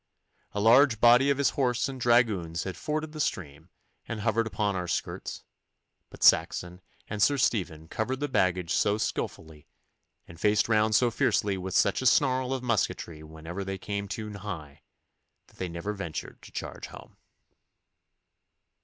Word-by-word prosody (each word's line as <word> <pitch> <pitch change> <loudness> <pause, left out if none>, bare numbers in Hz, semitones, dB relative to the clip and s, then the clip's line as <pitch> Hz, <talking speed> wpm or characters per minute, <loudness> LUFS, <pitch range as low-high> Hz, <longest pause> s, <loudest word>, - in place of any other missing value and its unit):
A 105 - -2
large 115 +2 +5
body 120 +4 +6
of 140 - +2
his 140 - +2
horse 125 -2 0
and 135 -2 -7
dragoons 110 -9 +2
had 95 - -5
forded 155 0 -3
the 155 - -9
stream 80 - -3 0.4
and 115 -2 -4
hovered 115 +1 +1
upon 105 -2 -1
our 90 -1 -3
skirts, - - -4 0.7
but - - -9
Saxon 90 +1 +3 0.3
and 105 -1 -4
Sir 140 +7 +4
Stephen 90 - -1
covered 125 +9 -3
the 145 - -1
baggage 90 -8 +1
so 105 0 +2
skilfully, 80 -7 -4 0.6
and 85 - -13
faced 105 +2 +2
round 110 -1 +3
so 120 +1 +3
fiercely 100 -2 +1
with 95 0 -5
such 100 - +3
a 130 - +2
snarl 130 +1 +3
of 130 -1 -2
musketry 100 -8 -1
whenever 80 +4 -7
they 95 0 -4
came 100 +1 -4
too 105 +2 -5
nigh, 85 -8 -8 0.6
that - - -25
they 95 - -4
never 85 +5 -4
ventured 95 -6 -6
to - - -14
charge - - -6
home. - - -13
105 Hz, 160 wpm, -28 LUFS, 90-120 Hz, 0.7 s, body